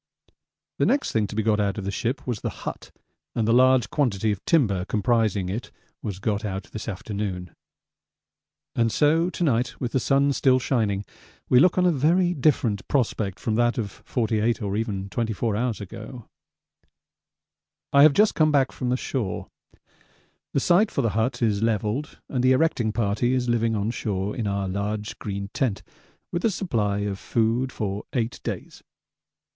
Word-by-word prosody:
The - - +3
next 280 +1 +1
thing 110 -2 +1
to - - -8
be 110 - 0
got 105 -1 +2
out 100 -1 0
of 105 - -4
the 100 - -1
ship 125 +5 -2
was 120 -5 -2
the - - -2 0.2
hut, - - -5 0.5
and 110 -2 0
the 115 - +4
large 130 -1 +4
quantity 110 -7 +1
of 100 - -4
timber 105 - +2
comprising 105 -2 +1
it 105 +6 -4 0.3
was 100 -5 -4
got 105 +1 -1
out 95 -2 -3
this 110 - -6
afternoon. 95 -3 -4 1.2
And 115 -1 +1
so 160 - +3
to 180 - -3
night, 120 -6 0
with 120 -2 -2
the 130 - +1
sun 140 +2 +2
still 130 -1 +4
shining, 110 -6 0 0.4
we 125 - +6
look 180 +6 +4
on 180 - +4
a 180 - +5
very 170 +5 +2
different 130 - +1
prospect 110 -7 0
from 110 - -1
that 120 0 +2
of 105 -4 -2
48 110 +1 -1
or 100 -1 -2
even 105 -3 -2
24 110 0 -1
hours 115 -1 -1
ago. 110 +4 -9 1.7
I 140 - +7
have 150 0 +8
just 210 +7 +4
come 155 -1 +3
back 135 -3 +3
from 125 - -3
the 125 - +1
shore. 125 -7 -3 1.0
The - - +2
site 180 +9 +4
for 140 - -1
the 115 - +2
hut 115 +4 0
is 105 -3 +1
levelled 115 +5 -1
and 125 -2 -1
the 130 +1 +5
erecting 130 -6 +1
party 115 +3 +1
is 125 -1 0
living 115 -1 +1
on 105 +2 -1
shore 100 -4 -2
in 115 -4 -2
our 100 -1 -1
large 105 +3 -3
green 100 -1 -5
tent 110 -7 -1 0.5
with 175 - -2
a 230 - +4
supply 110 - -1
of 100 -1 -3
food 115 +5 0
for 100 -3 -4
eight 120 -2 -2
days. - - -6
115 Hz, 175 wpm, -25 LUFS, 105-130 Hz, 1.7 s, have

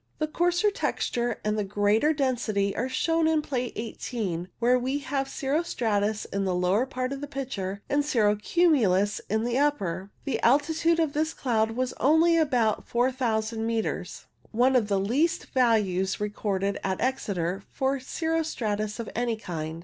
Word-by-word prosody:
A 310 - +1
coarser 350 +6 +1
texture 240 - -1
and 210 -2 -1
greater 210 +8 +3
density 235 -9 0
are 250 +4 -1
shown 325 +4 +1
in 315 -1 +2
Plate 250 -4 -3
i8, 215 -6 -4
where 245 +2 +3
we 260 +3 -1
have 275 -1 -2
cirro 280 +4 0
stratus 215 -9 -1
in 200 0 -2
the 185 -2 0
lower 185 +8 +2
part 255 0 -3
of 275 - -6
the 290 - -4
picture, 205 -9 -4
and 290 +1 +1
cirro 220 -8 +2
cumulus 210 - +2
in 220 +2 +1
the 240 +2 0
upper. 195 -11 0 0.2
The 275 - -1
altitude 320 +6 +3
of 315 -3 +1
this 315 +2 -1
cloud 225 -3 0
was 255 0 -1
only 320 +4 +4
about 250 -9 +1
4000 235 -3 0
metres, 225 -5 -3 0.2
one 250 +4 +3
of 235 -4 +3
the 200 -2 +1
least 295 - +1
values 210 -7 +2
recorded 200 -1 -2
at 190 -1 -1
Exeter 200 -8 -1
for 270 +1 0
cirro 325 +5 -1
stratus 215 -8 -3
of 230 - -4
any 235 -1 0
kind. 160 -6 -5
240 Hz, 160 wpm, -27 LUFS, 205-280 Hz, 0.2 s, only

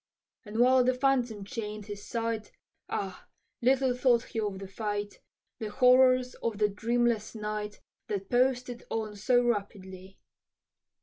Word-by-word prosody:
And 210 +1 -6
while 255 +1 +5
the 255 +1 +2
phantom 250 -5 +1
chain'd 210 -1 -5
his 205 -1 -7
sight, 230 -2 -3 0.4
Ah! - - -4 0.3
little 260 +1 +3
thought 245 -2 +3
he 225 - -5
of 205 -3 -2
the 195 0 -7
fight 205 +1 -4 0.4
The 220 - -4
horrors 255 +2 +5
of 230 -3 -2
the 210 0 +3
dreamless 230 +1 0
night, 210 -1 -4 0.3
That 195 -1 -3
posted 250 -1 +1
on 215 -2 -3
so 245 +4 +3
rapidly. 195 -4 -3
225 Hz, 135 wpm, -29 LUFS, 210-250 Hz, 0.4 s, while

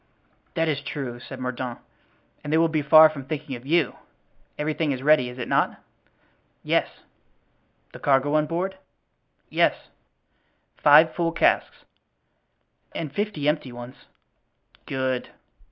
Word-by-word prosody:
"That 165 -1 +1
is 145 -3 -1
true," 130 -4 -5
said 130 +1 -10
Mordaunt, 125 -1 -4 0.7
"and 145 - -5
they 160 - +3
will 165 0 +4
be 155 -1 -1
far 155 +2 +8
from 155 -3 -7
thinking 150 -2 -5
of 120 +2 -11
you. 160 -2 +1 0.6
Everything 155 0 -1
is 130 -1 -4
ready, 150 -4 +4
is 125 - -10
it 125 - -5
not?" - - +1 0.8
"Yes." - - +1 1.0
"The - - -10
cargo 140 +1 +2
on 155 0 +2
board?" 185 +4 -3 0.7
"Yes." - - +1 0.9
"Five 155 +2 +6
full 170 -1 0
casks?" 165 - +1 1.1
"And 155 -4 -5
fifty 205 -8 -2
empty 150 -4 0
ones." 120 +3 -11 0.8
"Good." 130 -2 -2
145 Hz, 130 wpm, -24 LUFS, 130-160 Hz, 1.1 s, far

